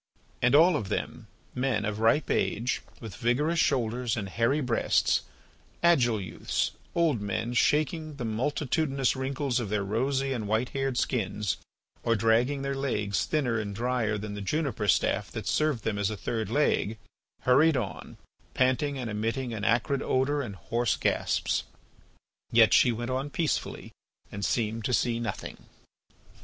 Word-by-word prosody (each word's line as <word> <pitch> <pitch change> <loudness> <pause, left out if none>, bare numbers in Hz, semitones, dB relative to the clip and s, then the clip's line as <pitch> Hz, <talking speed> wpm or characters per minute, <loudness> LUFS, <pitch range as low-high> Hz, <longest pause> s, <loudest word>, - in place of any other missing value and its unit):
And 125 +3 +4
all 170 +4 +6
of 100 - -3
them, - - -4 0.3
men 125 -4 0
of 105 0 -3
ripe 115 +7 +2
age 120 +4 0 0.2
with 110 -6 -8
vigorous 150 +8 +1
shoulders 120 -4 +1
and 100 -3 -3
hairy 115 +8 +1
breasts, 125 -5 +2 0.6
agile 125 -10 +4
youths, 90 -4 -2 0.2
old 160 -10 +2
men 105 +4 -2
shaking 155 +4 +1
the 125 -4 -5
multitudinous 135 +4 0
wrinkles 130 -1 -1
of 115 -5 -3
their 105 -1 0
rosy, 135 +6 0
and 110 -5 -3
white 110 +4 0
haired 135 -2 -2
skins, 105 -6 -1 0.4
or 115 - +2
dragging 115 +6 +2
their 140 0 -1
legs 105 -8 -1
thinner 125 -7 0
and 100 -2 -4
drier 115 -2 0
than 105 0 -5
the 105 - -5
juniper 135 -2 -1
staff - - +2
that - - -6
served 155 -8 +1
them 105 -2 -1
as 100 - +1
a 105 - -4
third 110 0 -3
leg, 115 -4 +1 0.4
hurried 140 +4 +4
on, 110 -6 -5 0.4
panting 130 +2 +1
and 125 -3 -4
emitting 115 +4 -2
an 105 -2 -5
acrid 120 +5 +1
odour 140 +3 +1
and 105 -7 -6
hoarse 110 +8 0
gasps. - - 0 0.9
Yet 115 -1 +6
she 125 - +6
went 120 +2 -3
on 135 +3 -2
peacefully 160 +1 -2 0.4
and 100 0 -5
seemed 115 0 0
to 125 - 0
see 120 -1 0
nothing. 115 -4 -5
120 Hz, 155 wpm, -28 LUFS, 110-135 Hz, 0.9 s, all